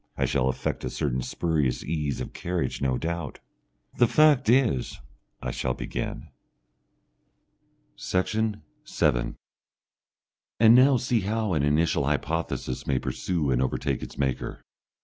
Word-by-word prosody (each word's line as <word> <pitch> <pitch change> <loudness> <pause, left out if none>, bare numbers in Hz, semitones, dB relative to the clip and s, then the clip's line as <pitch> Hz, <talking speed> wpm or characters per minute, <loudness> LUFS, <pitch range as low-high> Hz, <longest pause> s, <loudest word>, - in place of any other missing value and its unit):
I - - +1
shall 65 - +1
affect 65 - -3
a - - -2
certain 65 -3 -1
spurious 75 -2 -1
ease 75 -4 -2
of - - -6
carriage 85 -4 -3
no 65 -2 +1
doubt. 85 -2 -4 0.6
"The 120 - +6
fact 150 -4 +4
is, 120 - +2 0.5
I 60 - -2
shall 60 0 -2
begin...." - - -5 1.7
Section 105 - -1 0.2
7 - - 0 1.2
And 115 0 +8
now 130 +2 +6
see 120 0 +1
how 105 0 -1
an 75 - +1
initial 75 +3 +2
hypothesis 80 -5 -2
may 70 - +2
pursue 75 +1 -1
and 60 0 +2
overtake 65 - -1
its - - -8
maker. 65 -3 -2
80 Hz, 130 wpm, -26 LUFS, 65-110 Hz, 1.7 s, And